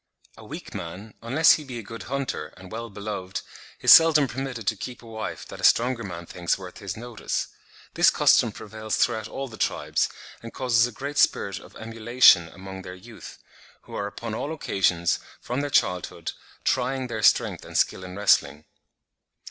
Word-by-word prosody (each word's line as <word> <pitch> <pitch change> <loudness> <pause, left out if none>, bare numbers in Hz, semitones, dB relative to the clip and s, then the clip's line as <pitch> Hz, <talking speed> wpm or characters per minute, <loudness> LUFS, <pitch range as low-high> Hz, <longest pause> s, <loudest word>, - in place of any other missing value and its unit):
A - - -14
weak - - -9
man, 95 +6 -7
unless 135 +8 +5
he 155 - +2
be 130 -4 -7
a 115 - -6
good 115 +3 -9
hunter, 135 - -3
and 95 0 -13
well 115 +1 -5
beloved, 100 -2 -5 0.4
is - - +6
seldom 155 -3 +8
permitted 125 -3 -5
to 110 - +1
keep 120 +4 -8
a - - -13
wife 110 -1 -6
that - - -9
a - - -12
stronger 120 0 +3
man 85 -3 -7
thinks 85 0 -1
worth 95 -2 -10
his 100 -1 -6
notice. 120 0 -4 0.4
This - - +6
custom - - +4
prevails 110 0 -5
throughout 110 -3 +1
all 135 +3 -5
the 110 -3 -11
tribes, - - 0 0.3
and 115 - -8
causes 120 -3 +3
a - - -8
great 140 +5 -4
spirit 100 -1 +2
of - - -16
emulation 115 -5 +4
among 95 +2 -9
their 90 0 -8
youth, 90 - -12 0.5
who - - -14
are 100 - -2
upon 110 +2 -6
all 140 +7 -3
occasions, 90 - +1 0.2
from 125 +3 -3
their 145 - -2
childhood, 90 - 0 0.3
trying 130 +1 0
their 110 -3 -4
strength - - +3
and - - -5
skill 95 - +1
in 90 0 -8
wrestling." 75 -7 +2
110 Hz, 180 wpm, -25 LUFS, 95-125 Hz, 0.5 s, seldom